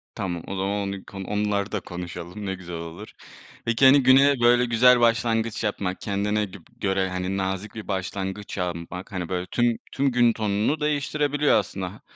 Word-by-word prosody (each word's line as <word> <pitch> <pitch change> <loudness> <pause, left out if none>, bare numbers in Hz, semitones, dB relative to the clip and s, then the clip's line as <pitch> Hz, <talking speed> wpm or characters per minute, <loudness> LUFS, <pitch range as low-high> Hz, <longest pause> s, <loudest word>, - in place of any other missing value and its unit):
Tamam, 90 -5 -3
o 100 - -4
zaman 95 +1 -1 0.2
onu 100 -1 -6
k - - -14
onları 105 +1 -1
da 105 - -1
konuşalım, 90 +3 -7
ne 95 0 -2
güzel 90 -2 -8
olur. 85 +5 -8 0.5
Peki, 115 +3 +3
hani, 135 0 +7
güne 135 +1 +6
böyle 120 +1 +5
güzel 120 +1 +5
başlangıç 115 -1 +1
yapmak, 100 -3 -2
kendine 105 +1 0
gib 95 -2 -12 0.2
göre, 95 -1 0
hani, 90 +1 -2
nazik 95 +3 -3
bir 110 - -7
başlangıç 95 +1 -4
yapmak, 90 +1 -4
hani, 90 -3 -4
böyle 90 -1 -2
tüm 120 -1 +2
tüm 140 -1 +1
gün 120 -1 +4
tonunu 105 +7 0
değiştirebiliyor 150 0 +1
aslında. 95 -1 -4
Ha, - - -16
100 Hz, 175 wpm, -25 LUFS, 95-120 Hz, 0.5 s, hani